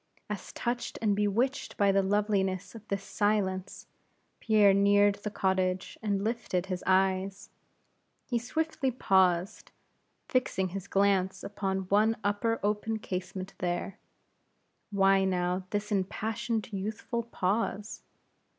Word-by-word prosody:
As 205 -3 -5
touched 240 0 -3
and 210 -3 +2
bewitched 215 +7 0
by 200 -1 +4
the 195 0 +3
loveliness 195 -1 0
of 220 -2 -12
this 195 0 -2
silence, 195 -1 -1 0.5
Pierre 210 -3 +5
neared 205 +1 +5
the 210 - -3
cottage, 190 -2 0
and 200 -2 0
lifted 215 -5 -1
his 185 -2 -4
eyes, 190 +1 +1 0.7
he 240 -2 0
swiftly 315 +2 -1
paused, 190 -5 +2 0.6
fixing 190 -8 0
his 195 +1 -6
glance 190 -2 +2
upon 195 -1 -2
one 210 +4 +2
upper, 205 +3 0
open 210 +2 0
casement 185 -1 -5
there. 175 +2 -2 0.9
Why 195 -1 +4
now 180 0 0
this 205 +2 -3
impassioned, 215 +3 -2
youthful 215 +4 -3
pause? 210 -1 -2
200 Hz, 115 wpm, -29 LUFS, 190-215 Hz, 0.9 s, Pierre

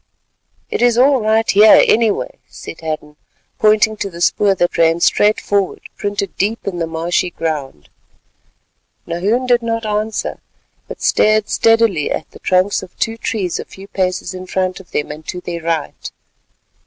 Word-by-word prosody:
"It - - -2
is 240 -1 +3
all 265 0 +4
right 220 +1 +2
here, 210 +2 +7
anyway," 235 - +1
said - - -10
Hadden, 155 -2 -5 0.4
pointing 215 0 +3
to 200 - -3
the 170 -2 -11
spoor 195 +3 +2
that 175 -1 0
ran 165 0 +3
straight 210 +4 +3
forward 200 -2 -1
printed 205 -1 -3
deep 215 +4 -1
in 180 -3 -3
the 165 - -1
marshy 165 +2 -1
ground. 150 - -4 1.2
Nahoon 200 +9 -1
did 245 -1 +3
not 230 -1 -2
answer, 215 +1 -2 0.5
but - - -9
stared 215 0 +3
steadily 225 -9 +2
at - - -3
the - - -14
trunks 185 +2 +1
of 185 - -13
two 225 -1 -1
trees 205 -5 -3
a - - -4
few 195 +1 -13
paces 185 -2 -2
in 185 0 -8
front 185 0 -2
of 190 - -15
them 150 - -3
and 155 +1 -10
to 180 - -4
their 170 -1 -6
right. 160 -3 -3
195 Hz, 165 wpm, -17 LUFS, 170-220 Hz, 1.2 s, here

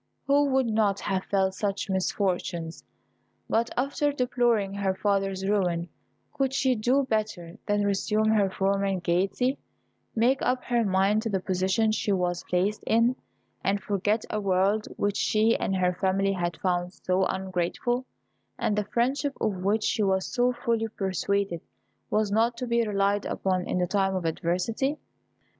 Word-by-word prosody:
who 285 +1 +4
would 265 -2 +2
not 215 -3 +1
have 190 -2 -1
felt 190 -1 +1
such 200 0 -2
misfortunes. 180 -3 -2 0.6
But, 230 +1 +1
after 280 +3 +1
deploring 240 -6 +1
her 195 -1 -1
father's 195 -1 0
ruin, 175 -4 0 0.4
could 270 -1 -1
she 265 -2 +3
do 250 +5 +2
better 215 -6 -3
than 205 -1 +1
resume 210 +2 +1
her 210 -3 +3
former 195 0 0
gaiety, 195 +10 0 0.6
make 245 +4 +2
up 250 0 0
her 240 -1 +1
mind 195 +1 +2
to 225 - -3
the 195 -2 0
position 190 +4 +1
she 215 -1 -1
was 180 -2 0
placed 190 +4 0
in, 230 +3 +3 0.5
and 200 +1 +1
forget 205 +2 0
a 215 - -1
world 195 +2 +1
which 205 0 0
she 220 +2 +3
and 195 - -1
her 180 -1 +2
family 195 +1 +1
had 175 -2 -2
found 180 -1 -1
so 185 0 0
ungrateful, 190 +7 -2 0.5
and 210 - 0
the 210 -1 0
friendship 265 +6 0
of 210 -4 0
which 205 +4 0
she 225 - 0
was 190 -2 +1
so 245 0 +3
fully 235 -2 -1
persuaded 195 -3 -1 0.5
was 215 -1 +1
not 230 +3 +2
to 250 - -3
be 235 -1 +2
relied 200 0 +1
upon 185 -2 -1
in - - -1
the 180 - +2
time 195 +1 0
of 185 -2 -2
adversity? 180 - -1
200 Hz, 155 wpm, -27 LUFS, 190-230 Hz, 0.6 s, who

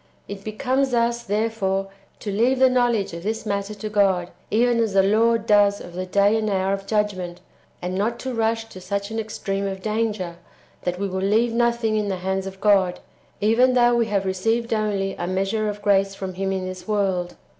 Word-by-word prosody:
It 200 0 -7
becomes 255 +4 0
us, 235 0 +1
therefore, 205 -3 -1 0.3
to 205 - -3
leave 240 +6 +2
the 260 0 +5
knowledge 240 -7 +1
of 170 - -6
this 220 +5 -3
matter 200 0 -2
to 210 +1 -5
God, 195 -4 +2 0.2
even 235 +2 +2
as 225 -3 +1
the 195 0 +5
Lord 225 +3 +3
does 205 -2 +4
of 175 - -10
the 185 +1 -4
day 200 +3 +3
and 215 -1 -1
hour 190 -1 +1
[of 195 0 -5
judgment], 195 -5 -1 0.4
and 180 +1 -2
not 215 +5 0
to 260 -1 -4
rush 225 0 0
to 185 - -11
such 200 +2 -3
an 225 - -2
extreme 200 -2 -3
of 190 -1 -5
danger, 215 -5 -2 0.5
that 180 0 0
w^e 200 +1 -1
will 190 0 -3
leave 220 +4 +2
nothing 235 -2 +1
in 210 -1 0
the 195 - -1
hands 190 0 -1
of 190 0 -8
God, 195 -4 +3 0.4
even 245 +5 +4
though 240 -1 +5
w^e 235 -1 +2
have 200 -2 0
received 225 +5 0
only 205 -3 0
a 175 - -2
measure 195 +4 0
of 205 0 -6
grace 195 -1 +2
[from 190 -1 -5
Him 195 +1 -2
in 190 -1 -2
this 185 +1 -7
world]. 190 -4 0
205 Hz, 205 wpm, -23 LUFS, 195-225 Hz, 0.5 s, the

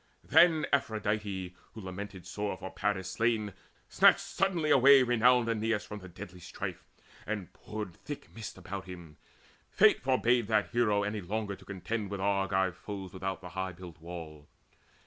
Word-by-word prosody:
Then 165 -3 +5
Aphrodite, 105 -6 -1 0.2
who 110 - -8
lamented 95 0 -7
sore 105 -2 -3
For 95 - -7
Paris 95 -3 -1
slain, 110 +1 0 0.3
snatched - - +6
suddenly 175 -6 0
away 135 0 +8
Renowned 125 0 +4
Aeneas 110 -1 0
from 105 - -7
the 90 -2 -11
deadly 90 +1 -10
strife, 85 - -6 0.4
And 105 -4 -4
poured 105 -4 -6
thick 145 - -9
mist 110 -4 -7
about 95 +1 -6
him. 85 -4 -10 0.5
Fate - - +5
forbade 125 -3 +2
That 110 -2 +1
hero 105 -4 +2
any 105 +1 -2
longer 100 +2 -3
to - - -17
contend 100 +2 -4
With 100 -1 -4
Argive 95 -2 +1
foes 95 -2 -7
without 95 0 -4
the 90 - -8
high 95 +2 -4
built 85 -2 -11
wall. 80 -3 -9
100 Hz, 155 wpm, -31 LUFS, 95-115 Hz, 0.5 s, away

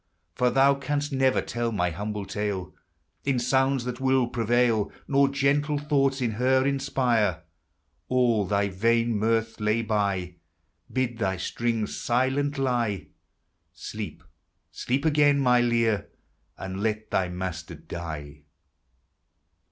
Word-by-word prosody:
For 125 +5 +2
thou 135 +2 +5
canst 145 +1 -2
never 130 -1 +2
tell 120 -1 -2
my 90 -5 0
humble 105 +3 -4
tale 105 -3 -3 0.5
In 135 -2 +1
sounds 130 +1 +2
that 125 0 -4
will 130 -1 +3
prevail, 120 -2 +1 0.2
Nor 140 0 +4
gentle 145 +2 +1
thoughts 140 -2 +1
in 120 -2 +1
her 130 +4 +2
inspire; 125 - +1 0.6
All 120 -6 +2
thy 100 0 +1
vain 115 +4 +1
mirth 115 +1 0
lay 110 +2 +1
by, 100 -5 -1 0.5
Bid 125 -3 -1
thy 95 -3 0
strings 115 +3 -2
silent 135 +4 0
lie, 120 - -1 0.6
Sleep, 105 -6 -7 0.5
sleep 135 +5 -2
again, 145 -2 +4
my 125 -2 +4
Lyre, 115 -3 +1 0.5
and 95 +1 -5
let 110 0 -2
thy 90 -2 +1
master 90 -2 -5
die. 75 -2 -7
115 Hz, 120 wpm, -26 LUFS, 105-135 Hz, 0.6 s, thou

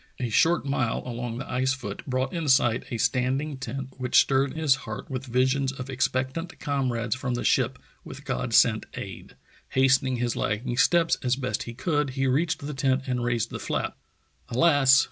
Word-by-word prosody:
A 125 -2 -2
short 165 +9 +3
mile 130 -4 -1
along 120 -1 -4
the 135 - -6
ice 130 +1 +1
foot 105 -6 -6
brought 130 +4 -1
in 165 -3 -2
sight 130 -4 +3
a 120 - -3
standing 130 +5 0
tent 130 0 -5
which 125 -1 +4
stirred 135 +1 +2
his 155 -4 +3 0.2
heart 105 - -6
with 130 +1 -4
visions 130 +2 +1
of 135 0 -7
expectant 130 +5 -2
comrades 125 -6 -1
from 125 -1 -3
the 120 - -3
ship - - +2 0.3
with - - -10
God 60 0 -2
sent - - +4
aid. - - -8 0.3
Hastening 130 0 +3
his 120 -1 -1
lagging 115 +3 -2
steps 170 +4 +3
as 125 -2 +1
best 130 -1 -2
he 115 - -8
could, 150 0 0
he 135 - +1
reached 145 +3 0
the 150 - -4
tent 135 0 +1
and 125 -3 -1
raised 120 -2 -1
the - - -5
flap. - - -2 0.5
Alas! 140 0 +5
130 Hz, 185 wpm, -26 LUFS, 125-140 Hz, 0.5 s, Alas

